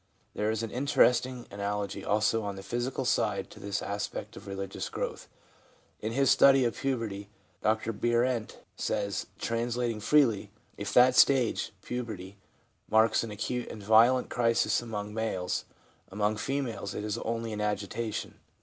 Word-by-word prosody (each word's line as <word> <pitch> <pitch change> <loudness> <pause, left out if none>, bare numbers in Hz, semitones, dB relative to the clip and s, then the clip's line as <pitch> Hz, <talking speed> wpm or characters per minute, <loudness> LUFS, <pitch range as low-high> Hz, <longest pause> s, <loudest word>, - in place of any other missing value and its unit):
There 105 +1 -1
is 110 0 -1
an 115 - -4
interesting 125 -2 +2
analogy 100 0 -3
also 110 +2 +2
on 100 -2 -4
the 95 - -8
physical 120 +5 -2
side 100 -5 0
to - - -12
this 100 0 -3
aspect 100 0 -4
of - - -11
religious 95 0 -4
growth. - - -4 0.7
In 110 - -3
his 135 +1 +3
study 135 -2 +6
of 120 - 0
puberty, 115 -7 -3 0.3
Dr 110 +1 +1
Bierent 120 +1 0 0.2
says 100 -1 -2
(translating 120 -1 -1
freely), 110 -4 +3
' - - -35
If - - -3
that 125 +1 +7
stage 130 -4 +4
(puberty) 110 -6 -5 0.5
marks 110 +1 +4
an 115 - -5
acute 120 +4 -3
and 105 - -8
violent 115 +5 +5
crisis 115 -1 +2
among 105 -3 -5
males, 110 -5 -2 0.4
among 105 +2 0
females 135 -2 -3
it 105 - -3
is 105 +2 -2
only 115 -1 -3
an 105 - -3
agitation. 105 +1 -3
110 Hz, 150 wpm, -29 LUFS, 105-120 Hz, 0.7 s, that